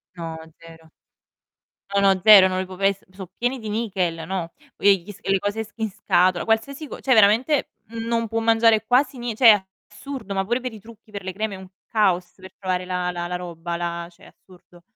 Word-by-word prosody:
No, 165 -1 -6 0.2
zero. 165 -1 -16 1.0
No, 200 - +3
no, 185 - -6
zero. 205 -3 +9
Non 185 0 -2
li 190 - -2
può 185 0 -10
pes 195 +1 0
so' 185 -1 -10
pieni 250 +2 -1
di 220 -2 -7
nichel, 190 -7 -2
no, 180 -3 -4 0.3
ehm, 200 - +5
gli 205 - -9
s 200 - -14
e - - -2
le 195 - +3
cose 205 +3 -2
s 215 - -17
in 220 -2 -2
scatola, 185 -3 +1
qualsiasi 270 +7 -1
co - - -9
cioè 265 - +2
veramente, 225 +7 +3 0.2
mhmm, 225 +1 -6
non 230 -1 0
può 225 +1 -2
mangiare 225 -1 +3
quasi 260 +2 +2
nie 240 -2 -4
cioè 245 +1 +5
è 205 -2 +2 0.3
assurdo, 230 -1 -7
ma 195 - 0
pure 240 +5 0
per 255 0 -4
i 220 - -10
trucchi, 220 +1 -17
per 200 -2 -7
le 185 0 -5
creme 210 +1 -3
è - - -9
un 190 0 -11 0.2
caos 185 -5 +1
per 190 0 -14
trovare 185 -1 -2
la 180 -1 -2
la 175 -1 -4
la 180 - -4
roba, 170 -1 -5
la 170 0 -4
cioè 180 +3 -23
è - - -14
assurdo. 175 -1 -20
200 Hz, 230 wpm, -23 LUFS, 180-225 Hz, 1.0 s, zero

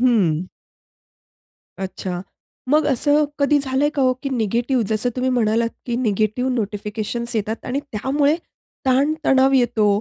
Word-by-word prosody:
हं. 185 -9 +2 1.3
अच्छा. 185 -1 -4 0.5
मग 305 +1 +4
असं 290 +2 +3
कधी 285 +1 +4
झालंय 275 +2 +1
का 280 - +1
हो? 255 -1 +4
की 275 - -1
निगेटिव्ह, 240 +1 0
जसं 220 +3 0
तुम्ही 255 0 0
म्हणालात, 230 -1 +2 0.2
की 240 -1 -1
निगेटिव्ह 220 +2 0
नोटिफिकेशन्स 220 +2 -3
येतात 220 +1 -2
आणि 255 +3 -1
त्यामुळे 280 +7 +1 0.5
ताण-तणाव 270 0 +3
येतो, 240 -4 +3
245 Hz, 125 wpm, -21 LUFS, 215-270 Hz, 1.3 s, मग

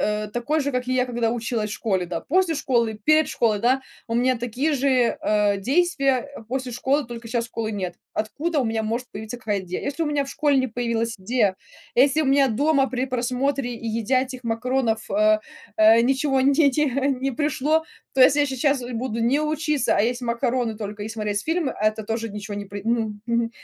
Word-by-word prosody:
э, 210 0 -1
такой 285 +7 0
же, 285 0 -1
как 250 -2 -2
и 255 - 0
я, 255 0 +2
когда 235 -2 0
училась 230 -2 -2
школе, 190 -4 -1
да? 170 -1 -3
После 360 +1 +1
школы, 235 -6 0
перед 310 0 +5
школой, 220 -3 +1
да, 260 +4 +2 0.2
у 230 - -3
меня 250 +1 +2
такие 245 +6 -1
же, 260 -3 +2
а, 210 -1 +2
действия, 275 - +1
э, - - -10
после 260 0 -3
школы, 265 +4 0
только 235 -1 -8
щас 230 0 -1
школы 225 -1 -4
нет. 185 -4 -4 0.2
Откуда 295 +9 -1
у - - 0
меня 225 -1 -1
может 235 +3 -2
появиться 220 +2 -7
какая 210 -3 -1
идея? 185 -1 -5
Если 290 +4 -2
у - - -2
меня 290 -1 0
в 275 - -8
школе 290 -1 +1
не 260 0 +1
появилась 230 -1 -2
идея, 205 -1 +1 0.4
если 275 +4 +4
у - - +1
меня 275 0 +4
дома 275 +3 +2
при 255 +2 -2
просмотре 255 +1 -1
и 230 0 -6
едя 230 +3 +1
этих 255 -1 -8
макаронов, 230 -1 -1
а, 215 +1 +3 0.4
а, 220 +1 +6
ничего 270 +2 +2
не 270 +2 +4
те 290 -1 +5
те 300 +3 +1
не 270 0 0
пришло, 300 +3 +1 0.3
то 265 - +1
если 270 +3 +6
я 290 - +3
сейчас 270 +1 +1
буду 230 -1 -3
не 250 +6 +2
учиться, 305 -1 0
а - - +3
есть 245 +3 -1
макароны 235 -1 -1
только 210 -1 -6
и - - -5
смотреть 210 -2 -2
фильмы, 325 -3 -1
а 215 - -1
это 215 0 -6
тоже 225 +1 -3
ничего 210 0 -6
не 205 - -5
при 200 0 -7
мгм, 220 -2 -1
мгм. 235 -1 0
245 Hz, 210 wpm, -23 LUFS, 220-275 Hz, 0.4 s, а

